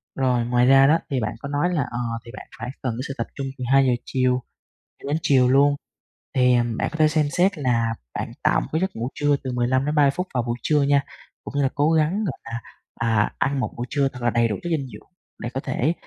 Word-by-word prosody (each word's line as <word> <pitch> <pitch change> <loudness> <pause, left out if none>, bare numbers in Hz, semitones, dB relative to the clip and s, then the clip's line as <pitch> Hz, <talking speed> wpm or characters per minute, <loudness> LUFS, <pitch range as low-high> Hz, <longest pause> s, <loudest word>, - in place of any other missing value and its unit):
Rồi, 125 -3 +1
ngoài 120 0 +3
ra 135 +1 +7
đó, 160 +3 +5
thì 135 -2 0
bạn 110 -1 -3
có 140 - -6
nói 145 +5 0
là, 155 - +1
ờ, 120 - -3 0.3
thì 115 - -10
bạn - - -10
phải 125 +2 -5
cần 125 -3 -1
cái 130 - -3
sự 135 - -4
tập - - -2
trung, 135 -1 -4
từ 125 - -5
2:00 135 -1 +5
chiều 130 -1 +1 0.6
cho - - -6
đến 150 +2 +1
chiều 135 -6 +4
luôn. 140 +2 +4 0.6
Thì, 125 -1 +4
à, 120 - +3
bạn - - -1
có - - -7
thể 155 - +6
xem 155 0 +2
xét 185 0 +3
là 115 -4 +1 0.2
bạn - - -4
tạo - - +3
một - - -6
cái 160 +3 0
giấc 190 - -1
ngủ 115 +2 -3
trưa 145 -1 +2
từ 130 - -3
15-30 130 +4 +2
phút 180 +5 -3
vào 125 -2 0
buổi 120 0 -2
trưa 150 -2 +3
nha, 140 0 +3 0.4
cũng - - -8
như - - +3
là 135 - +2
cố 145 +2 +2
gắng, 165 +7 +2
gọi 155 - -4
là, 115 +1 -5 0.4
à, 110 -3 +1
ăn 135 0 0
một - - -2
bữa 120 - -3
trưa 140 -1 +1
thật 125 - -9
là 120 - +2
đầy 115 0 +2
đủ 105 - -2
chất 175 - -3
dinh 145 -5 -1
dưỡng - - -13 0.3
để 120 - -4
có 135 - -2
thể 140 +4 0
135 Hz, 260 wpm, -23 LUFS, 125-145 Hz, 0.6 s, ra